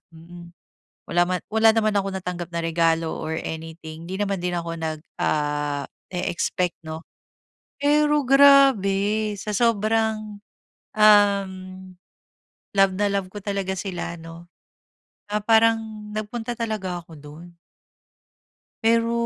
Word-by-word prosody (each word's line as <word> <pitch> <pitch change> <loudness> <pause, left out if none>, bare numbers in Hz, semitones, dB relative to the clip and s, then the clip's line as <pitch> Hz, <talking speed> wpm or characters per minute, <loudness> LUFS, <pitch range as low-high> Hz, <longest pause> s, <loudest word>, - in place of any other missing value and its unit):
mm. 170 +1 -13 0.6
Wala 175 0 +3
man 180 -1 -1
wala 220 0 +5
naman 215 -1 +2
akong 195 -1 0
natanggap 180 -1 -5
na 170 - -1
regalo 165 0 +1
or 160 0 -3
anything. 160 0 -7
'Di 190 +2 -5
naman 200 -2 -1
din 180 - 0
ako 170 -1 -3
nag 160 -1 -3 0.2
ah, 145 -1 -1 0.3
e-expect, 180 0 -1
'no? 160 +1 -6 0.8
Pero 295 0 +3
grabe 220 -7 +5
sa 210 - -4
sobrang 220 -2 0 0.6
uhm, 205 -2 +5 1.2
love 195 -1 +4
na 205 - +2
love 195 -2 -1
ko 205 - -7
talaga 195 -2 -2
sila, 180 -3 -4
'no, 165 +1 -11 0.8
ah 210 0 -1
parang 225 0 +4 0.4
nagpunta 225 +2 -4
talaga 195 -6 -3
ako 165 - -17
doon. 155 +4 -12 1.3
Pero 230 +1 +3
195 Hz, 120 wpm, -23 LUFS, 170-220 Hz, 1.3 s, wala